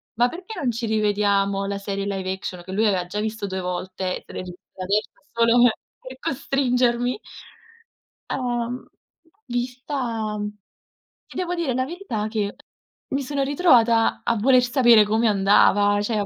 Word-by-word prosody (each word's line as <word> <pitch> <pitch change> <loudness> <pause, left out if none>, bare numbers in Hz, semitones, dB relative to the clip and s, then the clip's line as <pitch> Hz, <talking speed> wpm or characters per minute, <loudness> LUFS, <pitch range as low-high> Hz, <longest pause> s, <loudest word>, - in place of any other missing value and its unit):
“Ma 240 +2 +4
perché 360 - -8
non 250 -4 0
ci 230 0 -3
rivediamo 200 -2 +1
la 200 0 -2
serie 200 0 -4
live 190 -2 -2
action", 180 -2 -7
che 190 - -8
lui 220 +3 +2
aveva 185 -3 +1
già 210 +3 -3
visto 220 -1 -3
2 190 -1 -3
volte, 185 +1 -4
se - - -13
l'è - - -5
rivista 185 +1 -10
adesso 210 +4 0 0.2
solo 230 +1 +4 0.4
per 255 0 -10
costringermi. 250 - 0 1.1
Uhm, 245 -1 -2 0.6
vista, 250 +3 -4 0.4
mhmm, 210 0 -3 0.8
ti - - -13
devo 355 -1 -1
dire 330 -8 -1
la 255 0 +1
verità 285 - -4
che 210 -2 -2 0.5
mi 275 +1 -1
sono 275 +1 -2
ritrovata 240 -7 +3
a 235 -1 +1
voler 255 +4 +4
sapere 240 -4 +5
come 220 +2 +2
andava, 205 0 +4
cioè 215 0 -1
225 Hz, 150 wpm, -23 LUFS, 200-250 Hz, 1.1 s, sapere